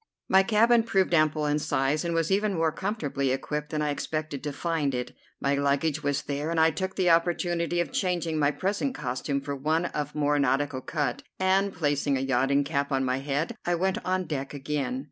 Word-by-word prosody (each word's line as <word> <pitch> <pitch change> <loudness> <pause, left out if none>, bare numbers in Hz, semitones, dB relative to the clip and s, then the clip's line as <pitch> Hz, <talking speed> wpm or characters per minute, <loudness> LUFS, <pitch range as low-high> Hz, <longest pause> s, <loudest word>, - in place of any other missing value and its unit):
My 190 - +6
cabin 230 +4 +4
proved 195 -5 +1
ample 155 -1 +3
in 150 0 +1
size, 140 +1 0
and 170 -1 -1
was 165 +2 0
even 200 0 +2
more 165 -1 +2
comfortably 155 -7 -2
equipped 150 +3 -2
than 155 -1 -1
I 150 - 0
expected 155 -1 -4
to 150 - -2
find 150 -2 -1
it. 125 0 -4 0.2
My 140 - +1
luggage 140 +2 +1
was 145 -1 -1
there, 145 +2 -3
and 165 -1 0
I 160 0 +5
took 190 +3 -3
the 180 -3 +3
opportunity 170 0 +1
of 175 - -1
changing 175 -4 -1
my 145 -1 +4
present 200 - -1
costume 130 +3 -2
for 140 0 -4
one 155 +5 0
of 150 -3 -4
more 145 -1 +2
nautical 140 0 +1
cut, 150 - -2 0.2
and, 190 +1 +2
placing 145 -4 0
a - - -2
yachting 135 +2 +2
cap 140 -1 -1
on 135 -1 +1
my 130 +1 0
head, 140 +3 -2
I 175 - +1
went 190 +2 0
on 185 0 0
deck 140 -3 -4
again. 150 - -2
150 Hz, 200 wpm, -27 LUFS, 140-175 Hz, 0.2 s, My